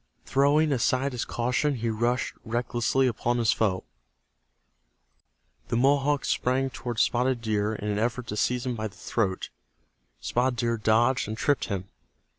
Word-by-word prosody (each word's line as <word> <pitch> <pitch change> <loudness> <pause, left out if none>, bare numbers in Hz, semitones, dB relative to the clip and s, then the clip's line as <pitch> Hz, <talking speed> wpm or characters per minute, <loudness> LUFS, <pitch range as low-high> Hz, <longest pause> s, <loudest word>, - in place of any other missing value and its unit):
Throwing 145 +3 +3
aside 130 +2 +1
his 125 -2 -3
caution, 125 +5 0
he 115 -1 -1
rushed 120 +3 0
recklessly 120 +3 0
upon 120 0 0
his 115 -2 +3
foe. 95 -4 0 1.8
The 115 - -1
Mohawk 140 +2 +2
sprang 130 +1 0
toward 120 -3 -5
Spotted 125 +2 +2
Deer 110 -1 -1
in 105 - -5
an 105 0 0
effort 120 +2 -1
to 105 - -3
seize 125 +4 0
him 125 - -1
by 110 -1 -3
the 100 - -15
throat. 95 -5 -2 0.7
Spotted 125 - 0
Deer 115 0 0
dodged 115 +4 +2
and 110 +1 -4
tripped 145 +3 +1
him. 95 -3 -4
120 Hz, 150 wpm, -27 LUFS, 110-130 Hz, 1.8 s, Throwing